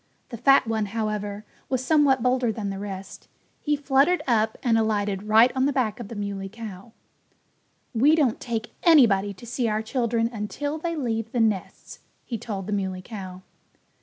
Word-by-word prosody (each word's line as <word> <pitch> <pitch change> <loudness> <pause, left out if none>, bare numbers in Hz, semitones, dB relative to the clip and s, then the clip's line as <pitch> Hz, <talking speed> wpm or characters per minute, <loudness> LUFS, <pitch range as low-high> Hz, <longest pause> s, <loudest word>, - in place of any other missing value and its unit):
The 235 - -6
fat 275 +4 +5
one, 220 -2 -1
however, 210 -1 -3 0.2
was 260 -1 -1
somewhat 280 -4 +3
bolder 250 -2 +2
than 205 -2 -4
the 195 - -5
rest. 195 -1 -8 0.3
He 295 -1 0
fluttered 285 +5 +2
up 220 -3 +1
and 235 -3 +3
alighted 205 -3 0
right 225 +3 +6
on 260 +1 +2
the - - +1
back 245 -4 -1
of 235 - -6
the 230 - -8
Muley 200 -1 -4
Cow. 215 -1 -9 1.0
"We 275 +7 +5
don't 275 -8 +1
take 230 -2 -4
anybody 225 - +5
to 235 - -12
see 240 0 -1
our 215 +1 -1
children 230 -1 0
until 285 +8 -4
they 335 +1 -3
leave 225 -6 -2
the 245 - -1
nests," 215 -4 -2 0.3
he 230 -3 -4
told 195 -4 -5
the 210 - -3
Muley 190 -2 -2
Cow. 190 -4 -8
225 Hz, 175 wpm, -25 LUFS, 205-255 Hz, 1.0 s, right